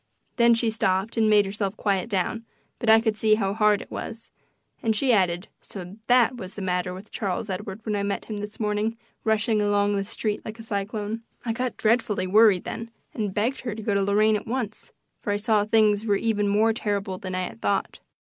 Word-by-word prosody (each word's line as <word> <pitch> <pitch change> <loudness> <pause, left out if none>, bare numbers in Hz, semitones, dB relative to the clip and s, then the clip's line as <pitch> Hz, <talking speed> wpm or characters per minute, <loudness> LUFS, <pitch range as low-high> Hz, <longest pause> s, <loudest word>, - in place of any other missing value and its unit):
Then 235 -1 +6
she 230 -1 +1
stopped 195 -1 0
and 220 -2 +3
made 210 -1 +5
herself 200 +1 -3
quiet 200 0 0
down, 210 +3 -1 0.4
but 235 - 0
I 220 0 +8
could 220 -1 0
see 215 0 +4
how 195 -2 -1
hard 210 -1 +3
it - - -21
was, 225 0 -7 0.5
and 220 -1 +1
she 255 +3 +3
added: 180 -2 +1
"So 190 0 -9
THAT 245 0 +4
was 185 -4 -8
the 205 - -6
matter 180 0 -1
with 190 +4 -10
Charles 200 0 -2
Edward 195 +2 -5
when 215 -2 -1
I 200 - 0
met 200 0 -2
him 215 - -5
this 205 +1 -7
morning 215 +1 -1 0.3
rushing 220 0 +2
along 205 0 +2
the 195 - 0
street 210 0 -3
like 220 +1 -7
a 225 - -9
cyclone." 210 +1 -3 0.2
I 230 - 0
got 250 +2 -3
dreadfully 215 -4 +1
worried 205 -1 +5
then 230 0 -6 0.2
and 210 -3 -2
begged 225 +7 -1
her 235 -4 -4
to 220 - -7
go 205 - 0
to 200 - +2
Lorraine 210 +2 +3
at 210 - -4
once, 230 -3 -3 0.3
for 205 - -3
I - - +1
saw 210 -1 +2
things 215 -1 +3
were 210 -3 +2
even 205 0 0
more 215 +3 +3
terrible 200 -4 -2
than 185 -1 -5
I 185 - -1
had 115 -10 -7
thought. 100 - -1
210 Hz, 215 wpm, -25 LUFS, 200-225 Hz, 0.5 s, I